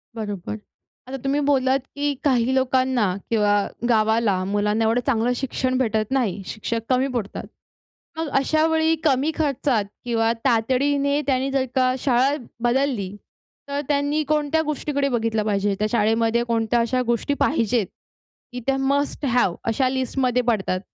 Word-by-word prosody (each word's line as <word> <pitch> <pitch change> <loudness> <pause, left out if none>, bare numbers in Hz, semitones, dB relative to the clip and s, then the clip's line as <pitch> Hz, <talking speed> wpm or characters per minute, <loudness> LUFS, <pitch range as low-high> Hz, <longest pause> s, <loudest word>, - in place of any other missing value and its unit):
बरोबर, 210 -2 -5 0.5
आता 270 +1 -5
तुम्ही 275 +1 +1
बोललात, 265 -1 +2 0.2
की 290 0 0
काही 255 -3 +2
लोकांना 260 -2 +2 0.2
किंवा 210 -3 +2 0.4
गावाला, 220 -4 +2
मुलांना 205 +2 0
एवढं 225 +2 +2
चांगलं 240 -2 +2
शिक्षण 255 0 -1
भेटत 220 -3 0
नाही, 235 -8 0
शिक्षक 225 +1 -3
कमी 260 +1 +2
पडतात. 210 -4 -4 0.7
मग 325 0 -2
अशावेळी 320 +2 +2
कमी 285 0 +2
खर्चात 275 -7 0 0.2
किंवा 225 -1 +1
तातडीने 275 +4 +2
त्यांनी 265 0 +1
जर 270 -1 +1
का 255 -1 +3
शाळा 260 +2 +2 0.3
बदलली 240 -6 0 0.5
तर 280 +1 -1
त्यांनी 290 +1 +1
कोणत्या 305 +1 +1
गोष्टीकडे 290 -2 -1
बघितलं 225 -3 0
पाहिजे 200 -1 0
त्या 210 - +1
शाळेमध्ये 225 +1 +2
कोणत्या 230 0 +1
अशा 255 +2 0
गोष्टी 235 +4 0
पाहिजेत 230 -6 +1 0.7
की 250 - -4
त्या 270 0 +2
मस्ट 280 +2 0
हॅव 245 -9 +2
अशा 255 +3 +1
लिस्टमध्ये 255 -1 0
पडतात. 195 -5 0
255 Hz, 140 wpm, -23 LUFS, 225-275 Hz, 0.7 s, का